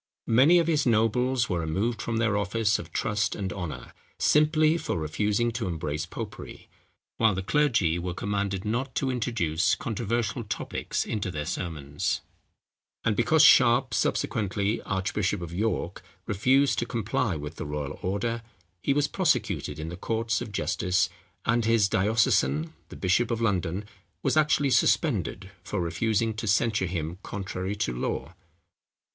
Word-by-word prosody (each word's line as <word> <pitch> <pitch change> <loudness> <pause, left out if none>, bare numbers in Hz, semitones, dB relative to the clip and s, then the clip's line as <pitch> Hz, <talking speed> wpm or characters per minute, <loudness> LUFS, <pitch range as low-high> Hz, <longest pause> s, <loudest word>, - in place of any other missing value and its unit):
Many 140 +9 +7
of 170 - +3
his 155 -4 +1
nobles 120 +3 +2
were 90 -3 -1
removed 100 +9 -1
from 115 0 -2
their 115 -3 +1
offices 105 +1 +1
of - - -9
trust 105 0 0
and 95 -2 -3
honour, 85 -5 -6 0.2
simply 155 +1 +4
for 165 - -2
refusing 105 +9 0
to 115 -3 -3
embrace 80 -2 -3
popery, - - -8 0.5
while 110 -4 +3
the 95 - -3
clergy 110 - +2
were 90 0 -4
commanded 100 -1 -2
not 120 +4 -2
to 130 +2 0
introduce 95 -9 +1
controversial 115 +1 -2
topics 105 - -3
into 105 -4 -2
their 75 -4 -4
sermons; 75 -4 -3 0.8
and 110 -2 +2
because 155 +8 +4
Sharp, 120 -4 +6
subsequently 100 +1 0
archbishop 95 0 -1
of 85 -1 -7
York, 105 +1 -2 0.2
refused 130 +7 +2
to 120 - -2
comply 115 -3 -1
with 75 +2 -7
the - - -4
royal 75 -1 -4
order, 115 +5 -1 0.4
he 140 - +1
was 145 0 +2
prosecuted 110 - 0
in 80 +1 -5
the 85 - -6
courts 115 +3 -1
of 115 -3 -6
justice, 90 -2 0 0.4
and 115 0 +2
his 115 -3 +4
diocesan, 90 -8 +2 0.2
the - - -10
bishop 100 +5 +1
of 115 -2 -1
London, 95 -3 0 0.4
was - - +1
actually 150 -2 +3
suspended 105 -4 +1
for - - -3
refusing 110 +6 0
to 110 +1 -5
censure 105 -1 +2
him 85 0 -4
contrary 95 -1 -4
to 65 -11 -1
law. - - -3
105 Hz, 150 wpm, -27 LUFS, 90-120 Hz, 0.8 s, Many